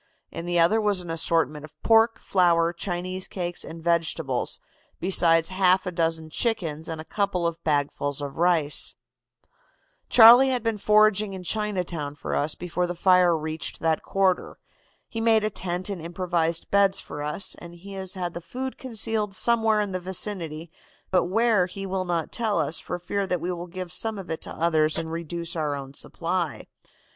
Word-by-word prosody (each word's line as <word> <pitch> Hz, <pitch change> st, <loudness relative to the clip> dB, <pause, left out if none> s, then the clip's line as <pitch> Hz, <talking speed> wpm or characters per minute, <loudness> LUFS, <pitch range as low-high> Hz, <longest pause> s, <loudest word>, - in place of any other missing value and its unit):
In 170 Hz, -, -6 dB
the 175 Hz, 0 st, +1 dB
other 210 Hz, +7 st, +4 dB
was 205 Hz, -3 st, +3 dB
an 175 Hz, -2 st, -7 dB
assortment 160 Hz, -3 st, 0 dB
of 155 Hz, -, -14 dB
pork, 225 Hz, 0 st, +4 dB
flour, 170 Hz, -2 st, +2 dB
Chinese 180 Hz, +1 st, -3 dB
cakes 175 Hz, -2 st, -3 dB
and 165 Hz, 0 st, -10 dB
vegetables, 165 Hz, -6 st, -1 dB, 0.4 s
besides 170 Hz, -2 st, +4 dB
a -, -, -7 dB
half 185 Hz, 0 st, +4 dB
dozen 165 Hz, -2 st, -1 dB
chickens 165 Hz, -10 st, -1 dB
and 160 Hz, -1 st, -5 dB
a 155 Hz, -, -8 dB
couple 200 Hz, -3 st, -1 dB
of 170 Hz, -1 st, -3 dB
bagfuls 145 Hz, -1 st, 0 dB
of 145 Hz, +1 st, -6 dB
rice.' 165 Hz, -4 st, +2 dB, 1.1 s
"'Charlie 245 Hz, +3 st, +9 dB
had 250 Hz, -3 st, -1 dB
been 225 Hz, -2 st, -1 dB
foraging 210 Hz, -1 st, +3 dB
in 185 Hz, -, -8 dB
Chinatown 180 Hz, -7 st, -2 dB
for -, -, -4 dB
us 145 Hz, +2 st, 0 dB
before 180 Hz, 0 st, -2 dB
the 175 Hz, -, -4 dB
fire 180 Hz, -1 st, +4 dB
reached 155 Hz, +1 st, -3 dB
that 160 Hz, -1 st, 0 dB
quarter. 190 Hz, -2 st, 0 dB, 0.5 s
He 225 Hz, -, -5 dB
made 225 Hz, -1 st, +3 dB
a 215 Hz, -, -1 dB
tent 180 Hz, -1 st, -2 dB
and 195 Hz, -5 st, -5 dB
improvised 170 Hz, -1 st, -2 dB
beds 200 Hz, -1 st, +3 dB
for 145 Hz, -, -6 dB
us, 150 Hz, +6 st, -2 dB
and 170 Hz, 0 st, -11 dB
he 195 Hz, +3 st, -11 dB
has 190 Hz, -1 st, -5 dB
the 175 Hz, -2 st, -5 dB
food 260 Hz, +8 st, -6 dB
concealed 220 Hz, -4 st, -2 dB
somewhere 225 Hz, 0 st, +3 dB
in 205 Hz, -2 st, -3 dB
the 185 Hz, -, -2 dB
vicinity, 175 Hz, -3 st, -2 dB, 0.4 s
but 185 Hz, -2 st, +3 dB
where 215 Hz, 0 st, +2 dB
he 195 Hz, +2 st, -7 dB
will 190 Hz, -1 st, -2 dB
not 170 Hz, -2 st, -2 dB
tell 220 Hz, -3 st, -1 dB
us, 150 Hz, +3 st, -1 dB
for 180 Hz, -, -5 dB
fear 195 Hz, +3 st, -3 dB
that 180 Hz, -2 st, -1 dB
we 175 Hz, +3 st, -3 dB
will 175 Hz, 0 st, -6 dB
give 180 Hz, 0 st, -7 dB
some 220 Hz, +3 st, 0 dB
of 190 Hz, -3 st, -7 dB
it 160 Hz, -, -4 dB
to -, -, -7 dB
others 155 Hz, -2 st, +2 dB
and 160 Hz, 0 st, -4 dB
reduce 170 Hz, +1 st, -3 dB
our 150 Hz, -3 st, -1 dB
own 135 Hz, -1 st, -8 dB
supply. 170 Hz, +1 st, -3 dB
175 Hz, 180 wpm, -25 LUFS, 165-200 Hz, 1.1 s, Charlie